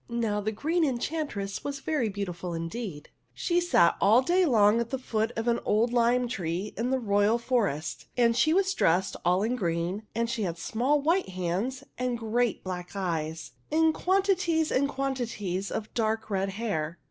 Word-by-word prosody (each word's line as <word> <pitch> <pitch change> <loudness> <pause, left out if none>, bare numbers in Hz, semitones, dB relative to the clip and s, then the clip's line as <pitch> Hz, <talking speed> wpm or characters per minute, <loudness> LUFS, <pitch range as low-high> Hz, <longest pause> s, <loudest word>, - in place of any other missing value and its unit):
Now, 225 -3 -1
the 215 +2 -1
Green 320 +10 0
Enchantress 255 -7 -2
was 280 -1 -3
very 275 -7 0
beau 200 0 -3
tiful 175 -1 -5
indeed. 165 -1 -5 0.3
She 350 0 +1
sat 345 - +4
all 225 +6 +5
day 355 +5 +3
long 215 -3 +4
at 235 -1 -2
the 265 - -2
foot 225 -3 -1
of 225 +1 -3
an 235 0 +2
old 230 +3 +2
lime 245 +1 +3
tree 190 -3 -3
in 235 +3 -1
the 265 - +2
royal 205 -1 +2
forest, 225 - -1
and 235 -1 +4
she 310 +6 +3
was 380 +2 +2
dressed 180 - +2
all 180 +3 +2
in 235 +3 0
green, 180 +1 -2
and 230 0 +1
she 235 -1 -3
had 175 -4 -2
small 250 - +1
white 335 - +1
hands 185 +9 -2 0.2
and 250 -1 -1
great 235 0 0
black 180 0 -6
eyes 165 -4 -3 0.2
and 320 +1 +4
quanti 390 +3 +2
ties 330 -3 0
and 280 +2 +2
quantities 235 -9 -3
of 220 -1 -5
dark 220 -1 -1
red 195 0 0
hair. 190 -6 -3
225 Hz, 180 wpm, -28 LUFS, 195-260 Hz, 0.3 s, all